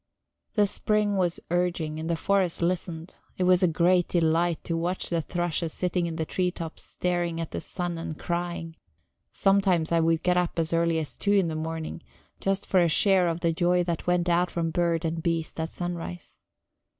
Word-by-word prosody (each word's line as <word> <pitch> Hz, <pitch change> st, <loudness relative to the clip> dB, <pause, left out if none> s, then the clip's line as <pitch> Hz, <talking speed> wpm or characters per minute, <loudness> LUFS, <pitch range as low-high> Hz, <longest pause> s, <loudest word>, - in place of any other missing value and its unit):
The 210 Hz, -2 st, +5 dB
spring 210 Hz, +1 st, +1 dB
was 180 Hz, -3 st, 0 dB
urging, 175 Hz, -3 st, 0 dB
and 160 Hz, +1 st, -4 dB
the 170 Hz, -, +2 dB
forest 185 Hz, -1 st, +1 dB
listened; 170 Hz, -1 st, -2 dB, 0.2 s
it 185 Hz, -, 0 dB
was 180 Hz, 0 st, +5 dB
a 180 Hz, -, +5 dB
great 175 Hz, +2 st, +3 dB
delight 170 Hz, 0 st, +1 dB
to 165 Hz, -, -2 dB
watch 175 Hz, +3 st, -2 dB
the 170 Hz, -1 st, +1 dB
thrushes 170 Hz, 0 st, -2 dB
sitting 180 Hz, -1 st, -1 dB
in 165 Hz, -, -4 dB
the 160 Hz, -1 st, -2 dB
tree 180 Hz, +3 st, 0 dB
tops 165 Hz, -3 st, -7 dB
staring 175 Hz, -2 st, -2 dB
at 165 Hz, -, -4 dB
the -, -, -4 dB
sun 175 Hz, -3 st, -3 dB
and 160 Hz, -2 st, -5 dB
crying; 170 Hz, -1 st, -4 dB, 0.5 s
sometimes 195 Hz, -5 st, +2 dB
I 170 Hz, -, +4 dB
would 165 Hz, 0 st, +2 dB
get 180 Hz, 0 st, +2 dB
up 180 Hz, -1 st, 0 dB
as 165 Hz, 0 st, 0 dB
early 165 Hz, 0 st, +2 dB
as 155 Hz, -2 st, -3 dB
two 205 Hz, -, +1 dB
in 195 Hz, -4 st, +3 dB
the 160 Hz, -, -3 dB
morning, 160 Hz, +1 st, -4 dB, 0.4 s
just 195 Hz, 0 st, 0 dB
for 190 Hz, -, +3 dB
a 170 Hz, -1 st, +4 dB
share 190 Hz, +2 st, +4 dB
of 170 Hz, 0 st, -2 dB
the 165 Hz, -1 st, +2 dB
joy 175 Hz, +1 st, +2 dB
that 170 Hz, -1 st, -3 dB
went 180 Hz, 0 st, +2 dB
out 175 Hz, +1 st, +2 dB
from 165 Hz, -1 st, -2 dB
bird 170 Hz, -1 st, 0 dB
and 165 Hz, 0 st, -2 dB
beast 165 Hz, -1 st, -2 dB
at 160 Hz, +1 st, -2 dB
sunrise. 175 Hz, -1 st, -6 dB
170 Hz, 200 wpm, -27 LUFS, 165-180 Hz, 0.5 s, The